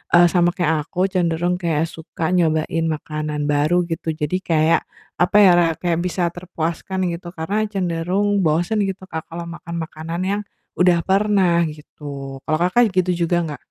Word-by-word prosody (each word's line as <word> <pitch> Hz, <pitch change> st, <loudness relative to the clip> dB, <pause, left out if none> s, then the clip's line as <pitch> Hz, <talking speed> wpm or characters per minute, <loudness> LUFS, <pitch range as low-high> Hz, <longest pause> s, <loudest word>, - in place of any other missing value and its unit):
eee, 175 Hz, -1 st, +6 dB
sama 175 Hz, +1 st, +2 dB
kayak 160 Hz, -3 st, 0 dB
aku, 185 Hz, +2 st, 0 dB
cenderung 175 Hz, 0 st, 0 dB
kayak 165 Hz, -3 st, 0 dB
suka 160 Hz, +1 st, -4 dB
nyobain 165 Hz, -1 st, +1 dB
makanan 150 Hz, -1 st, -3 dB
baru 155 Hz, +5 st, +2 dB
gitu. 160 Hz, -1 st, -2 dB
Jadi 155 Hz, +5 st, -1 dB
kayak 165 Hz, -3 st, +2 dB, 0.4 s
apa 180 Hz, +4 st, +1 dB
ya, 190 Hz, -, +8 dB
ra 170 Hz, -, +4 dB
kayak 170 Hz, -1 st, -1 dB
bisa 175 Hz, -1 st, -1 dB
terpuaskan 175 Hz, +1 st, -3 dB
gitu. 175 Hz, +1 st, -7 dB
Karena 205 Hz, +7 st, -1 dB
cenderung 190 Hz, +1 st, 0 dB
bosen 175 Hz, +5 st, +1 dB
gitu, 190 Hz, 0 st, -5 dB
Kak, 160 Hz, -1 st, -5 dB
kalau 170 Hz, +1 st, -6 dB
makan 170 Hz, 0 st, -8 dB
makanan 165 Hz, +1 st, -5 dB
yang 200 Hz, +2 st, -1 dB, 0.4 s
udah 175 Hz, -2 st, +4 dB
pernah 190 Hz, -4 st, +3 dB
gitu. 140 Hz, -3 st, -8 dB
Kalau 155 Hz, -, +2 dB
Kakak 200 Hz, +2 st, +3 dB
gitu 185 Hz, 0 st, +2 dB, 0.2 s
juga 175 Hz, -, +2 dB
nggak? 150 Hz, -4 st, -5 dB
170 Hz, 160 wpm, -21 LUFS, 160-185 Hz, 0.4 s, ya